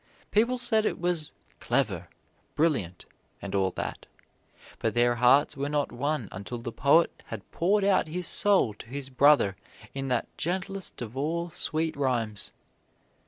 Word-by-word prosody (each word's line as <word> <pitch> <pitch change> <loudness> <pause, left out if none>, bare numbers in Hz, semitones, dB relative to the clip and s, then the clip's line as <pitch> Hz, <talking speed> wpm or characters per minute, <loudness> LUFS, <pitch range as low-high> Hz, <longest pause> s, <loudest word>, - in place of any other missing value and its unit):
People 235 +4 +3
said 225 -3 +2
it - - -1
was 175 -3 0 0.3
"clever," - - 0 0.5
"brilliant," 135 - 0 0.3
and 100 - -7
all 95 -1 +2
that, - - -6 0.7
but - - -1
their 120 0 +3
hearts 135 +5 +4
were 140 +1 -2
not 145 -1 0
won 140 -2 -2
until 100 +6 -6
the 115 0 -6
poet 145 +8 +4 0.2
had 110 -2 -8
poured 200 +4 +2
out 195 -4 +3
his 175 +3 -3
soul 195 - +3
to 105 - -13
his 135 +2 -6
brother 135 -7 +4 0.4
in 135 0 -4
that 125 -2 0
gentlest 190 -2 -3
of 115 +1 -9
all 165 +5 -2
sweet 160 0 -1
rhymes. 120 -7 -1
145 Hz, 150 wpm, -28 LUFS, 120-170 Hz, 0.7 s, hearts